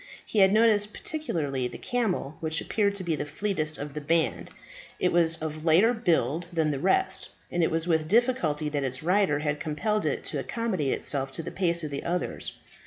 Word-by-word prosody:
He 215 - -1
had 190 -1 +6
noticed 210 -1 +4
particularly 145 - -2
the - - -8
camel 210 - -2
which 160 0 0
appeared 200 -2 0
to 195 - -4
be 170 -3 0
the 145 - -3
fleetest 155 -1 -2
of 145 0 -6
the 150 - -5
band; 165 +3 0 0.5
it 180 - +2
was 165 -1 +4
of 155 0 -5
lighter 175 +9 +5
build 175 - 0
than 160 -3 +1
the 140 - -3
rest, 380 - +1 0.2
and 175 - 0
it 165 - +3
was 165 +1 -1
with 160 -2 +1
difficulty 200 - +2
that 145 -2 -2
its 130 +1 -2
rider 180 -3 +2
had 150 0 -2
compelled 210 +8 -1
it - - -2
to - - -2
accommodate 205 - -1
itself 135 -2 +1
to 165 - -3
the - - -6
pace 170 -3 +1
of 150 - -4
the 140 - -4
others. 175 +1 -3
165 Hz, 200 wpm, -27 LUFS, 150-205 Hz, 0.5 s, had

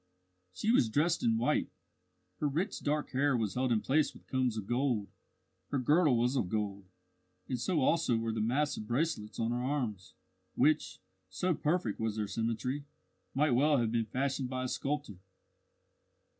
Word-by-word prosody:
She 210 - 0
was 125 - +4
dressed 160 +8 +2
in 115 -1 +2
white; 120 - +1 0.7
her 150 - +1
rich 165 +9 -1
dark 150 +1 -1
hair 140 0 +2
was 110 -4 -1
held 130 0 0
in 110 -2 +2
place 150 +3 +1
with - - -15
combs 130 -4 0
of 105 - -4
gold; 120 -3 0 0.6
her 140 - 0
girdle 145 +1 +4
was 125 +3 +1
of 100 -9 0
gold, 100 -2 -2 0.6
and 125 - -2
so 155 +6 +1
also 145 -4 +2
were 115 0 -1
the 110 - -1
massive 125 0 0
bracelets 120 -4 -1
on 115 0 0
her 120 +1 -1
arms, 120 -9 -3 0.4
which 155 +3 +2 0.3
so 180 - 0
perfect 150 - -1
was 110 -2 -1
their 105 -1 -1
symmetry 115 +7 -2 0.5
might 150 +1 +3
well 145 +4 +4
have 115 -3 +1
been 115 -1 +1
fashioned 130 +2 -1
by 130 0 -2
a - - -1
sculptor. 140 -8 -3
125 Hz, 170 wpm, -32 LUFS, 115-145 Hz, 0.7 s, was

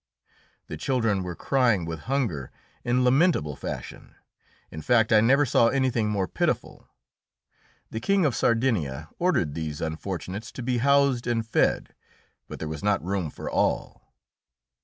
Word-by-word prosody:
The - - -7
children 115 -7 0
were 90 -2 -5
crying 120 -9 +1
with 80 +6 -7
hunger 115 - -1 0.3
in 125 +1 +1
lamentable 125 - +2
fashion. 70 - -8 0.6
In 80 - -7
fact, 115 +3 +3
I 110 - +6
never 135 +6 +4
saw 115 -2 +4
anything 125 -3 +1
more 100 -3 -1
pitiful. - - -2 1.0
The 110 - -3
King 195 +8 +2
of 135 -6 +1
Sardinia 90 - 0
ordered 170 - +1
these 75 -2 -4
unfortunates 90 +6 -5
to 130 - -6
be 125 0 0
housed 140 -1 +3
and 115 -2 0
fed, - - +1 0.5
but - - -8
there 80 - -5
was 75 -1 -5
not 100 -4 +1
room 95 -4 -2
for - - -9
all. - - -1
115 Hz, 145 wpm, -26 LUFS, 85-130 Hz, 1.0 s, I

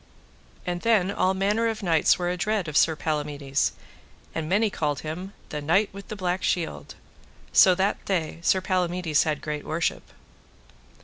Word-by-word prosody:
And 175 -1 -3
then 210 -5 +3
all 190 -1 +1
manner 205 +4 +1
of 220 -2 -3
knights 165 -4 +3
were 175 -1 -1
adread 200 0 -1
of 155 - -6
Sir 160 +1 +4
Palamides, 145 -3 -1 0.6
and 160 -1 -3
many 210 +3 +2
called 150 -5 -1
him 180 +6 -6 0.2
the 150 - -4
Knight 185 +8 +2
with 200 0 -10
the 215 - -6
Black 185 -2 -1
Shield. 170 -3 -2 0.6
So 185 -1 +7
that 195 +3 0
day 165 -4 -1
Sir 185 +2 +2
Palamides 180 -4 +1
had 155 -2 -1
great 150 -1 -4
worship. 160 +1 -2
180 Hz, 160 wpm, -25 LUFS, 155-195 Hz, 0.6 s, So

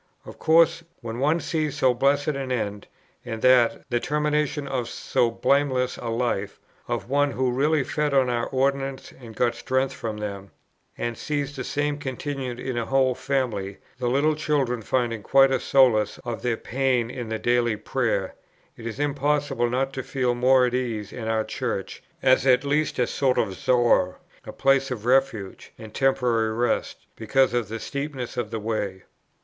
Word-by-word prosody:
Of - - -11
course, 165 +1 +4 0.2
when 115 0 -5
one 150 +5 +2
sees 155 -4 -2
so 130 -3 +3
blessed 140 +3 +2
an 135 -3 -3
end, 105 -4 -3 0.4
and 115 -2 -6
that, 125 -2 +4
the 120 - +2
termination 150 0 -1
of 130 -3 -2
so 120 - 0
blameless 130 +1 +1
a 120 - -6
life, 115 -4 -2 0.3
of 120 -1 -3
one 145 +2 +2
who 130 0 0
really 145 +3 +2
fed 150 +2 -1
on 135 -2 +3
our 120 -1 -1
ordinances 135 0 -1
and 115 -3 -11
got 120 0 +1
strength 130 +1 -1
from 110 -2 -5
them, 100 -2 -6 0.5
and 120 0 -3
sees 145 +2 -3
the 130 - -4
same 145 +1 -1
continued 130 -2 -4
in 130 -1 -4
a 115 - -3
whole 135 -1 +3
family, 120 -8 -2 0.2
the 125 - -1
little 145 +5 +2
children 140 -6 0
finding 115 -1 -1
quite 135 +4 +5
a 130 - +2
solace 115 -6 +3
of 120 -2 -4
their 120 -2 0
pain 125 -1 0
in 120 -4 -6
the 110 - -2
Daily 120 -1 +1
Prayer, 105 -3 -1 0.4
it 115 - -8
is 115 +3 -6
impossible 145 -3 0
not 135 +2 -1
to 130 - -3
feel 125 -1 -1
more 125 +1 +4
at 125 - -1
ease 115 -5 -3
in 115 -3 -5
our 110 -1 +1
Church, - - -4 0.2
as 130 0 +4
at 125 +1 +5
least 150 +2 0
a 125 - +3
sort 130 +1 0
of 95 - +1
Zoar, 120 -4 +2 0.3
a - - -7
place 135 0 +2
of 115 -4 -5
refuge 125 -6 0
and 110 -1 -11
temporary 120 -5 +1
rest, 120 0 -1
because 130 +4 +2
of 120 -3 0
the 115 +2 -5
steepness 140 -1 -5
of 120 -4 -2
the 115 0 -4
way. 105 -3 -3
125 Hz, 175 wpm, -24 LUFS, 115-135 Hz, 0.5 s, quite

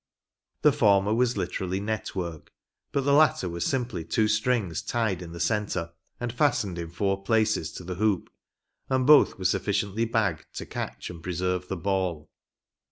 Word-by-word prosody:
The - - +7
former 100 0 +3
was 120 0 +2
literally 95 0 -2
net 110 +1 -3
work, 85 -4 -5 0.4
but 140 - +1
the 140 +1 +2
latter 150 -10 +4
was 85 0 -2
simply 125 -10 -2
two 105 +6 +1
strings 105 -5 0
tied 110 -6 -1
in 85 -2 -8
the 85 - -8
centre, 100 -5 -1 0.3
and 120 -1 -3
fastened 120 - +1
in 85 -1 -5
four 95 +3 -1
places 105 -5 +1
to - - -8
the 90 +1 -4
hoop; 100 0 0 0.6
and 130 -1 +2
both 150 +1 +6
were 95 - -7
sufficiently 100 +3 +1
bagged 110 -9 0
to - - -5
catch 65 +5 -5
and 85 -2 -10
preserve 90 +1 -2
the 95 - -3
ball. 90 -4 -2
95 Hz, 165 wpm, -27 LUFS, 90-110 Hz, 0.6 s, The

